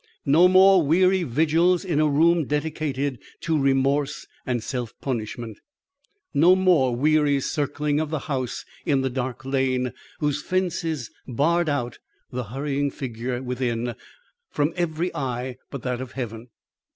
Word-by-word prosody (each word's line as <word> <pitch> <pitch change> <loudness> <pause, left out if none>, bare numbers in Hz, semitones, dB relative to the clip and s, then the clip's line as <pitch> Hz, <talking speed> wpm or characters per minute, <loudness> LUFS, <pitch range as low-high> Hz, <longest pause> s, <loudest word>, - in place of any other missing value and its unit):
No 160 +5 +6
more 190 0 +6
weary 185 +5 +3
vigils 165 +6 +2
in 165 -5 0
a 155 - +4
room 165 +2 +3
dedicated 145 -3 -2 0.2
to 165 -1 0
remorse 135 +1 +1 0.2
and 120 -3 -1
self 120 -4 -4
punishment. 115 -3 -4 0.7
No 165 +6 +6
more 175 -10 +3
weary 145 +1 +3
circling 145 +1 -1
of 155 -1 -2
the 155 - -1
house 130 -4 -3 0.2
in 140 -2 +2
the 130 -1 -1
dark 130 0 -4
lane 130 -2 0 0.2
whose 145 -2 -1
fences 165 -8 -2 0.2
barred 160 +7 +1
out 125 -5 -2 0.3
the 125 -1 -3
hurrying 140 +5 -2
figure 125 -1 -4
within 120 -2 -2 0.6
from 145 +3 0
every 175 0 -1
eye 125 -2 -3
but 140 -4 -7
that 125 -1 -2
of 130 - -7
Heaven. 120 -2 -6
140 Hz, 140 wpm, -24 LUFS, 125-160 Hz, 0.7 s, No